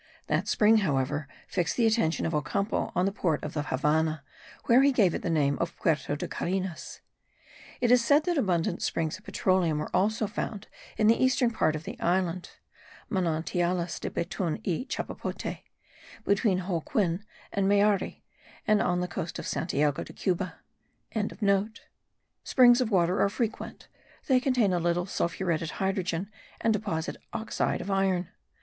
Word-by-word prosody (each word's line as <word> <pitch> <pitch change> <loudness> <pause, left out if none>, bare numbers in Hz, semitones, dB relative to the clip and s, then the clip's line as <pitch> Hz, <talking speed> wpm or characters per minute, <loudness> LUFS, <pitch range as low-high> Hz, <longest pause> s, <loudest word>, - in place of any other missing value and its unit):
That - - 0
spring, 220 +1 +5
however, 145 -5 0 0.2
fixed 170 -2 -1
the 235 - +3
attention 220 -8 +2
of 165 - -1
Ocampo 195 +8 -1
on 180 - +2
the 195 - +1
port 175 -6 -1
of 150 - -5
the 150 - -1
Havannah, 150 +2 0 0.4
where 240 +3 +6
he 280 +1 +5
gave 205 -10 +3
it - - -3
the - - -2
name 145 -3 +1
of 170 0 -2
Puerto 155 -3 0
de 145 - -4
Carenas. 185 -2 -4 0.8
It 245 -1 +3
is 250 -1 +6
said 285 +6 +4
that 350 +1 0
abundant 180 - 0
springs 165 +3 -1
of 210 - -25
petroleum 185 -5 +1
are - - -4
also 215 +4 +2
found 210 0 -5 0.3
in 215 - +2
the 230 +4 +4
eastern 260 -2 +3
part 155 -8 +1
of 155 - -5
the - - -7
island 180 0 0 0.6
(Manantialis 175 -1 0
de - - -3
betun 170 -1 -2
y 190 - -1
chapapote) - - -4 0.7
between 200 -1 +2
Holguin 180 +1 -1 0.3
and 200 -1 +1
Mayari, 205 -1 +2 0.4
and 215 0 +3
on 180 0 +1
the 180 - -1
coast 170 -1 -5
of - - -6
Santiago 145 -3 0
de - - -12
Cuba.) 185 0 -2 1.9
Springs 245 -1 +6
of 245 - 0
water 180 -2 +2
are 200 - +4
frequent; 225 +1 -4 0.4
they 260 -2 +4
contain 250 -7 +2
a 175 - +1
little 175 +1 0
sulphuretted 170 -3 -1
hydrogen, 190 -1 -1 0.3
and 225 - +2
deposit 190 -7 -2 0.2
oxide 220 -1 -1
of 200 - -4
iron. 190 -2 +1
185 Hz, 155 wpm, -28 LUFS, 165-215 Hz, 1.9 s, where